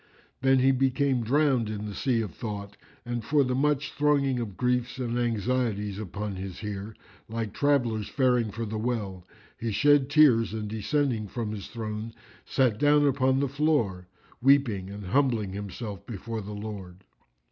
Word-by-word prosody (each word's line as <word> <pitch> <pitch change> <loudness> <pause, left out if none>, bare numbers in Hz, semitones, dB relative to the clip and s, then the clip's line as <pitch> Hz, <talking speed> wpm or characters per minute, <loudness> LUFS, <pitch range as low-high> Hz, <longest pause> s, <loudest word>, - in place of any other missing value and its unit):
Then 135 0 +4
he 130 +1 +4
became 130 -1 +1
drowned 130 -2 +2
in 105 -1 -4
the 105 - -5
sea 120 +1 +1
of 105 -7 -5
thought 100 -2 -6 0.3
and 120 -1 -3
for 145 +4 +3
the 125 -1 -1
much 145 +2 +1
thronging 140 -3 +2
of 105 -5 -5
griefs 125 0 0
and 120 -2 -2
anxieties 115 -3 -1
upon 105 0 -5
his 95 0 -6
heart, 105 0 -6 0.3
like 110 -2 -3
travellers 120 -7 +1
faring 125 -4 +2
for 115 +3 -4
the 110 0 -4
well, 105 -6 -3 0.3
he 115 -1 -2
shed 135 +5 +4
tears 125 -8 +5
and 105 -1 -3
descending 110 +1 -1
from 110 +1 -4
his 105 -2 -6
throne, 110 0 -5 0.3
sat 125 -5 +1
down 145 0 +5
upon 130 -1 +2
the 140 - +1
floor,[FN#356] 115 - -1
weeping 125 -8 +3
and 100 0 -7
humbling 115 -3 +1
himself 100 0 -6
before 115 0 -5
the 105 +1 -7
Lord. 100 -3 -7
115 Hz, 160 wpm, -27 LUFS, 105-130 Hz, 0.3 s, tears